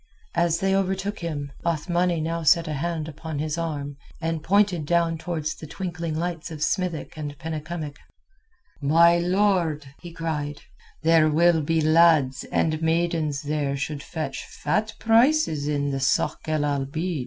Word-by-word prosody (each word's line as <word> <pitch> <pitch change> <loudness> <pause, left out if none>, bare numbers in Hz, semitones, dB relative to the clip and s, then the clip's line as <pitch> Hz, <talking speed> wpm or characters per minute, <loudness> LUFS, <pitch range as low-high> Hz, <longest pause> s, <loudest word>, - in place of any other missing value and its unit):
As 170 -1 +2
they 195 0 +2
overtook 195 +1 -1
him, 145 -5 -4
Othmani 170 +1 0 0.2
set 165 +2 +5
now 155 - -4
a - - -2
hand 160 +1 -2
upon 160 0 -6
his 155 +1 -2
arm, 145 -4 -4 0.2
and 165 -1 -2
pointed 185 -3 +2
down 170 -1 +2
towards 160 -3 -3
the 155 - -10
twinkling 170 -2 -4
lights 170 0 -3
of 155 -2 -4
Smithick 175 -2 -1
and 145 -2 -5
Penycumwick. 160 -1 -5 0.8
"My 170 +4 +5
lord," 175 -4 +1 0.2
he 175 - -9
cried, 150 -3 -4 0.4
"there 160 -1 +5
will 165 +1 +4
be 160 +2 +1
lads 155 -4 +4
and 155 -1 0
maidens 160 -3 0
there 145 -2 -1
should 140 +1 -3
fetch 155 -3 -5
fat 215 +9 -1
prices 230 - +3
in 145 -1 0
the 135 - -1
sôk 135 - 0
el 155 -1 0
Abeed." 145 +4 -2
160 Hz, 150 wpm, -25 LUFS, 150-170 Hz, 0.8 s, set